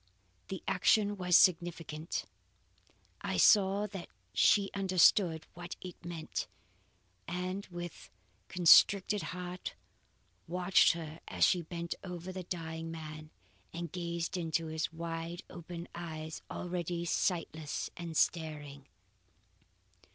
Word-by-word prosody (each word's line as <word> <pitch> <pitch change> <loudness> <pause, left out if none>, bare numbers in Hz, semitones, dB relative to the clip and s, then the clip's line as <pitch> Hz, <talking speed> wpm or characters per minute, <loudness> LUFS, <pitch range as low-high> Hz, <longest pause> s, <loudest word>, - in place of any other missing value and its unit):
"The 190 -3 -6
action 205 +2 +3
was 180 -2 +5
significant. 165 -2 +1 1.0
I - - -2
saw 200 0 +5
that 195 -4 -7 0.2
she 200 -2 +4
understood 185 -3 +4
what 175 0 -7
it 180 -2 -10
meant, 170 -2 -4 0.8
and 185 +2 -3
with 175 -2 -8 0.4
constricted 190 +3 +6
heart 180 0 -5 0.7
watched 180 +2 +4
her 160 -1 -7
as - - 0
she 180 - +5
bent 170 +1 -4
over 180 -1 -6
the 185 0 -5
dying 165 -2 -5
man 155 -1 -7 0.4
and 170 -1 -5
gazed 170 -1 -3
into 165 -1 -1
his 160 0 -2
wide 165 +1 -5
open 170 0 -7
eyes, 160 -2 -6
already 175 -1 -3
sightless 160 -3 -1
and 170 -2 -5
staring. 150 -4 -1
170 Hz, 105 wpm, -33 LUFS, 160-180 Hz, 1.0 s, constricted